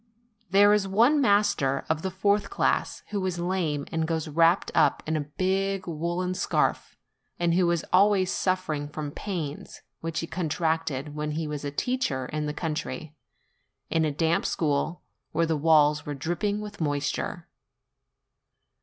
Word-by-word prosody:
There 205 +2 +6
is 205 -2 +2
one 235 +10 +4
master 200 - +2
of 160 0 0
the 190 - -2
fourth 200 +2 +1
class, 395 - 0
who 200 -2 -1
is 180 -2 -2
lame 170 -5 -1
and 160 -1 -1
goes 160 -1 -1
wrapped 165 +4 +3
up 160 - +3
in 160 - -1
a - - +1 0.2
big 195 +1 0
woollen 175 +3 -2
scarf, 190 - 0 0.4
and 170 -1 +2
who 175 0 +3
is 170 -2 0
always 190 -1 +4
suffering 185 -6 -1
from 150 -1 -5
pains 160 -6 -5 0.2
which 165 -1 -3
he - - -3
contracted 160 -4 -2
when 150 0 -3
he 160 +1 -2
was 150 -1 -5
a 145 - -2
teacher 145 - -1
in 150 +3 -3
the - - -1
country, 155 -1 -4 0.8
in 165 -1 +2
a 155 - +1
damp 165 +3 +1
school, 155 +3 -1 0.3
where 165 +1 +2
the 160 -1 0
walls 150 -1 +4
were 145 - -5
dripping 175 +9 -2
with 205 -3 -8
moisture. 145 -2 -2
165 Hz, 155 wpm, -27 LUFS, 150-190 Hz, 0.8 s, There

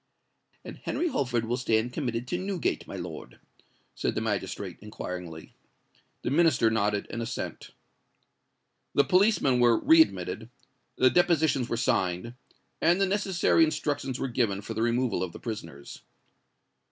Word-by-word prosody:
"And - - -8
Henry 350 - -2
Holford 120 - -1
will 120 +2 -1
stand 120 -1 0
committed 120 -4 -3
to 175 - -1
Newgate, 190 -2 -2
my - - -7
lord?" - - -8 0.5
said - - -2
the - - 0
magistrate, - - -3
inquiringly. 90 -6 -7 0.7
The - - -1
Minister 145 -7 +4
nodded 105 -2 0
an 115 - -4
assent. 115 - -5 1.3
The 140 - +5
policemen 175 - +3
were 120 -2 +5
re 320 +2 +6
admitted, 320 - -1 0.5
the 130 0 +4
depositions 160 -7 +2
were 115 - -1
signed, 90 +1 0 0.5
and 170 +3 +4
the 195 - +4
necessary 190 -4 +2
instructions 145 -4 -1
were 135 - -1
given 115 -6 0
for 115 - -5
the 110 - -3
removal 120 +1 +1
of 95 -2 -3
the - - -9
prisoners. 80 - -7
125 Hz, 140 wpm, -28 LUFS, 110-160 Hz, 1.3 s, re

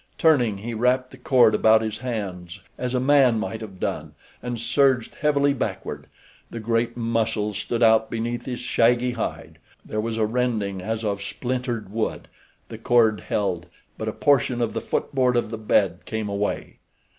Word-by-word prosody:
Turning, 125 -10 +3
he 115 +4 -5
wrapped 125 +3 +1
the 130 - -12
cord 125 -3 +4
about 110 +1 +4
his 110 -1 -4
hands, 100 -7 -5
as 125 0 -3
a - - +2
man 130 -3 +4
might 110 0 -4
have 100 -4 -9
done, - - -3 0.3
and 120 -2 -4
surged 130 0 +2
heavily 145 -1 +3
backward. 135 - -4 0.4
The 115 - -6
great 115 +1 -1
muscles 115 -3 -1
stood 120 0 -1
out 110 -1 +5
beneath 115 +1 -3
his 125 -2 -3
shaggy 125 0 +2
hide. 120 -2 -5 0.3
There 110 - -2
was 115 0 -3
a 110 - +2
rending 110 -5 -1
as 110 +3 -3
of 100 -1 -1
splintered 120 -2 -3
wood—the 110 +1 -6
cord 115 -3 +3
held, 90 -2 -2 0.3
but - - -5
a - - -4
portion 135 -4 +2
of 115 -2 -1
the - - -2
footboard 125 -2 0
of 120 -2 0
the 115 - -4
bed 95 -5 +2
came 110 -2 -3
away. 100 +1 -3
115 Hz, 170 wpm, -24 LUFS, 110-125 Hz, 0.4 s, out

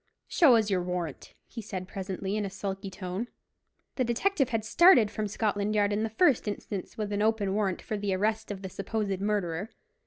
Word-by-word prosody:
"Show 285 -8 +6
us 215 -2 +2
your 185 -2 +2
warrant," 175 -4 -4
he 230 - -7
said 190 -4 -6
presently, 190 +1 -4
in 215 - 0
a 200 - -3
sulky 195 0 -5
tone. 190 +4 -4 0.7
The 260 - +2
detective 265 +4 +1
had 225 -3 -1
started 245 - +6
from 215 -1 -2
Scotland 205 0 -1
Yard 205 -1 +2
in 205 - 0
the 225 - -1
first 255 0 +3
instance 205 -1 -5
with 210 -2 -3
an 205 - 0
open 215 -3 +1
warrant 200 -3 -1
for 215 - -3
the 200 -2 -1
arrest 220 +3 0
of 200 -1 -6
the 190 - -4
supposed 195 0 -3
murderer. 200 -2 -1
205 Hz, 195 wpm, -29 LUFS, 195-220 Hz, 0.7 s, Show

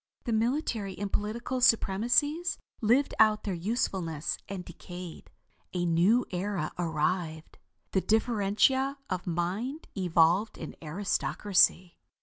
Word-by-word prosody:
The 235 - -2
military 225 - -1
and 200 0 -4
political 235 +5 -2
supremacies 245 - +2 0.2
lived 245 +6 +3
out 215 -1 +5
their 200 - -2
usefulness 175 -4 -2
and 190 -2 -5
decayed. 175 0 -9 0.4
A 175 -1 -1
new 180 +9 +3
era 180 -3 -2
arrived. 160 -1 -2 0.3
The 190 - +2
differentia 225 +6 +2
of 185 -1 -3
mind 190 - -2
evolved 180 +2 +2
an 160 - -7
aristocracy." 185 +1 +1
195 Hz, 110 wpm, -29 LUFS, 175-230 Hz, 0.4 s, out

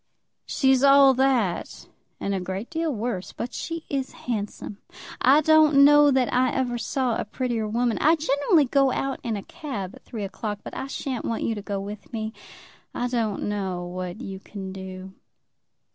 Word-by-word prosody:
"She's 265 -1 +3
all 275 -1 +7
that, 255 -8 0 0.3
and 200 - -2
a 195 - 0
great 190 - -5
deal 325 -1 -1
worse. 220 -6 -4
But 240 - -5
she 330 -1 -5
is 270 -2 -3
handsome. 210 -3 -4 0.4
I 275 +5 +6
don't 310 -2 +6
know 295 0 +7
that 260 -3 +2
I 255 0 +3
ever 245 -2 -1
saw 250 0 -1
a - - -1
prettier 230 0 -2
woman. 235 +1 0
I 315 +3 +5
generally 290 +1 +2
go 275 +1 +3
out 270 +1 -2
in 225 -3 -2
a 200 - -6
cab 205 - -6
at - - -15
three 220 -4 -6
o'clock, 205 +1 -5
but - - -8
I 265 - -4
sha'n't 265 -2 -4
want 230 - -2
you 230 - 0
to 210 - -5
go 200 -1 -3
with 205 0 -8
me. 220 -1 -4 0.6
I 245 - -1
don't 225 -4 -1
know 190 -4 -2
what 180 +2 -5
you 195 -5 -6
can 195 -1 -8
do. 190 0 -8
240 Hz, 180 wpm, -25 LUFS, 200-275 Hz, 0.6 s, all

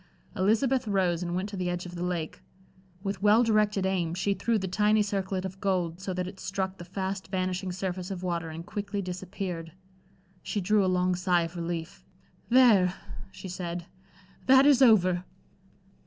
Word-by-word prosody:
Elizabeth 230 +6 +2
rose 185 -4 +1
and 175 0 -2
went 185 +2 -1
to 205 - -7
the 180 -2 -2
edge 175 0 -3
of 175 - -8
the 175 - -6
lake. 175 -3 -3 0.6
With 195 -2 -3
well 210 +3 +5
directed 210 -3 +2
aim, 175 -3 0
she 200 +2 +1
threw 220 +4 0
the 190 -2 -3
tiny 210 +3 +3
circlet 195 -2 -2
of 190 0 -7
gold 180 -3 -1
so 190 - -3
that 180 0 -1
it 190 0 -9
struck 190 0 -3
the 175 - -8
fast 190 +1 -4
vanishing 185 0 -2
surface 180 0 -4
of 185 -2 -5
water 170 -2 -2
and 165 +1 -7
quickly 205 0 -4
disappeared. 180 -2 -5 0.7
She 210 - -3
drew 205 +2 +3
a - - +1
long 180 0 +2
sigh 180 -1 +2
of 165 +1 -6
relief. 165 - -5 0.5
"There," 220 -8 +5 0.4
she 190 - -9
said, 175 -1 -5 0.6
"that 265 +1 +7
is 285 -3 +5
over." 185 -7 +5
185 Hz, 175 wpm, -28 LUFS, 180-200 Hz, 0.7 s, that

